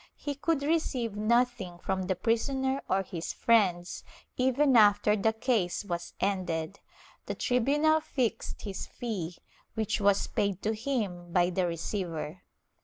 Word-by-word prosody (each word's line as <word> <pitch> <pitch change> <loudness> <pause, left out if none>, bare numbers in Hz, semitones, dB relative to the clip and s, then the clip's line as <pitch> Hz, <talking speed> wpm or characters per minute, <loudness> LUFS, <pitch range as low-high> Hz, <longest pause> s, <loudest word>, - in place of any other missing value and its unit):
He 290 - -4
could 285 +1 0
receive 275 -8 0
nothing 225 -4 +1
from 190 +1 -2
the 190 - +1
prisoner 265 +7 0
or 195 +1 +2
his 170 -3 -5
friends, 185 -6 +2 0.3
even 260 +2 +3
after 210 -1 +5
the 215 +2 +2
case 220 -5 0
was 175 -3 -4
ended; 185 -2 -1 0.5
the - - -3
tribunal 290 +6 +2
fixed 250 -7 -2
his 195 -3 -5
fee, 195 -9 -4 0.4
which 220 -1 -1
was 200 0 +3
paid 200 -2 -1
to 215 - +1
him 210 -8 -3
by 175 0 +3
the 180 0 +1
receiver. 170 -1 -4
210 Hz, 135 wpm, -29 LUFS, 180-250 Hz, 0.5 s, after